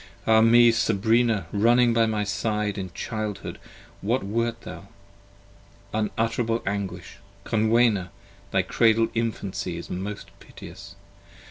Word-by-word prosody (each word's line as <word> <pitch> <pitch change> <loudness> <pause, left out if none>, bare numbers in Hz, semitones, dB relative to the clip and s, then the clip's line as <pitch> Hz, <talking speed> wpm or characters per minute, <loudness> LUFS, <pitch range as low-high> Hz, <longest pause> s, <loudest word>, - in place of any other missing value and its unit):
Ah 110 0 +5
me, 120 +1 +6
Sabrina, 115 -1 +1
running 120 +3 +3
by 115 -1 +3
my 105 -1 -1
side: 105 +1 -2
In 95 -1 -5
childhood 110 -1 -5 0.4
what 115 +4 0
wert 115 +3 -2
thou? - - -10 1.1
unutterable 115 +2 -1
anguish! 95 -3 -4 0.3
Conwenna! 110 -4 +2 0.4
Thy - - +1
cradled 115 0 +2
infancy 115 -4 -3
is - - -8
most 100 +3 -6
piteous. - - -12
110 Hz, 110 wpm, -25 LUFS, 100-115 Hz, 1.1 s, me